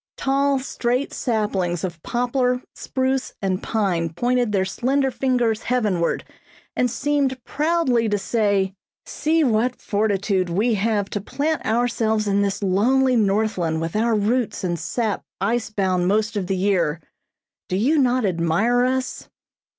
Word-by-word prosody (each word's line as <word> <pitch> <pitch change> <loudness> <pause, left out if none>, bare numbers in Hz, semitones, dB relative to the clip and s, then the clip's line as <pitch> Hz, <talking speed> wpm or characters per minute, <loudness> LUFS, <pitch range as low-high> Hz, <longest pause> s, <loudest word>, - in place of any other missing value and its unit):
Tall, 275 +1 +1
straight 255 0 -2
saplings 195 -7 -1
of 170 -3 -4
poplar, 250 +2 0
spruce 260 0 -2
and 190 -2 -1
pine 185 -7 0
pointed 240 +6 0
their 190 -2 +1
slender 265 +6 0
fingers 245 -4 0
heavenward, 210 -9 0 0.5
and 250 - +2
seemed 270 -1 -1
proudly 290 -8 +1
to 205 - +1
say: 200 -1 0 0.3
"See 320 +1 +1
what 245 0 +1
fortitude 200 -3 0
we 210 +8 +1
have 205 -1 0
to 205 - -2
plant 300 +9 -2
ourselves 220 -2 +1
in 200 0 +2
this 200 0 -1
lonely 250 +7 +3
Northland 195 -6 +1
with 165 +2 -4
our 225 +1 +2
roots 220 +3 0
and 175 -2 -1
sap 210 +6 -2 0.2
ice 225 +4 0
bound 185 -4 0
most 215 +3 +1
of 195 -3 -2
the 190 0 -1
year. 180 -5 +1 0.7
Do 185 - 0
you 285 +10 +3
not 255 -3 +2
admire 185 +7 +2
us?" 260 0 -2
220 Hz, 140 wpm, -22 LUFS, 195-250 Hz, 0.7 s, lonely